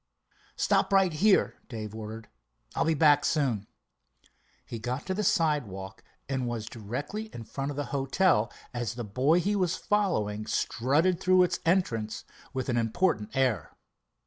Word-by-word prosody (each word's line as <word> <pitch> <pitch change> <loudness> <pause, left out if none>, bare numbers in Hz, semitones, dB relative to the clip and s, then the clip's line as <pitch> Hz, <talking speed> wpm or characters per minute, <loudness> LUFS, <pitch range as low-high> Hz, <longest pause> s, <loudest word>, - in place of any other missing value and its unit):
"Stop - - +2
right 195 -3 +4
here," 195 +6 +3
Dave 110 -3 -6
ordered. 110 +1 -7 0.5
"I'll - - 0
be 160 0 +2
back 145 -1 +5
soon." 125 -9 0 1.0
He 115 - -6
got 125 +5 -3
to 190 - -1
the 210 +3 -1
sidewalk, 125 - 0 0.2
and 130 -3 -1
was 115 -2 -3
directly 130 - -5
in 115 - -6
front 135 +5 -4
of 145 - -5
the 145 - -1
hotel 135 - +2 0.2
as 120 -2 -3
the 120 - -4
boy 130 - +2
he 205 +4 0
was 185 -3 +1
following 110 - 0
strutted 155 +9 +1
through 185 -1 +5
its 180 - 0
entrance 115 - 0 0.3
with 130 -2 -3
an 120 -2 0
important 115 - 0
air. 130 -4 0
135 Hz, 150 wpm, -28 LUFS, 110-175 Hz, 1.0 s, back